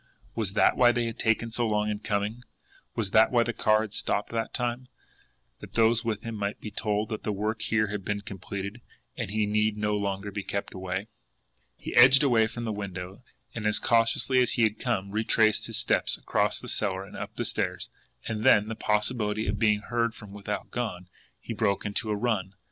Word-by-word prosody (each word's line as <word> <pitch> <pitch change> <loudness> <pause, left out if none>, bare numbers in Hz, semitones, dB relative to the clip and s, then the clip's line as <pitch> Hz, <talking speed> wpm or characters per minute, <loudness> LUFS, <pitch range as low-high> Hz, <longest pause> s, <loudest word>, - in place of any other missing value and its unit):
Was 100 -4 -2
that - - +4
why 120 -1 +6
they 120 0 0
had 115 -1 -5
taken 115 0 +1
so 120 +1 0
long 105 -1 +1
in 105 -1 -2
coming? 105 +3 -2 0.5
Was 105 -4 -1
that 110 +1 +6
why 120 -2 +4
the 120 - -2
car 110 -1 +3
had 110 -2 -5
stopped 105 - -1
that 115 -1 -2
time 125 0 -2 0.7
that - - -12
those 115 +1 +3
with 110 -2 -2
him 115 - -5
might 100 -1 -3
be 105 - -7
told 105 +1 -1
that 110 - -4
the 105 - -2
work 105 +2 -2
here 110 -1 +1
had 105 -1 -4
been 105 +1 -2
completed, 100 +2 -6 0.3
and - - -4
he 105 +1 +1
need 105 +1 +1
no 105 0 0
longer 100 0 -2
be 100 - -3
kept 100 +1 -4
away? 95 +1 -3 0.7
He - - -6
edged 130 +4 +8
away 115 -5 +4
from 120 +1 -6
the 110 - -1
window, 95 -1 -6 0.3
and, 110 -2 -2
as 105 - +3
cautiously 115 +3 +3
as 125 - +2
he 120 - +2
had 110 -1 +1
come, 95 +1 -1
retraced 110 0 +2
his - - -2
steps - - +1
across - - 0
the - - -9
cellar 95 -2 -1
and - - -12
up - - -6
the - - -2
stairs - - -2 0.4
and 110 -1 -3
then, 105 +1 +5
the 110 - -3
possibility 105 0 0
of 100 +1 -1
being 105 -2 +3
heard 115 0 -1
from 105 -3 -11
without 105 0 -5
gone, 90 -7 -4 0.3
he 115 - -6
broke 105 -3 0
into 105 +2 -2
a 105 - +1
run. 100 -4 -1
105 Hz, 210 wpm, -27 LUFS, 100-115 Hz, 0.7 s, edged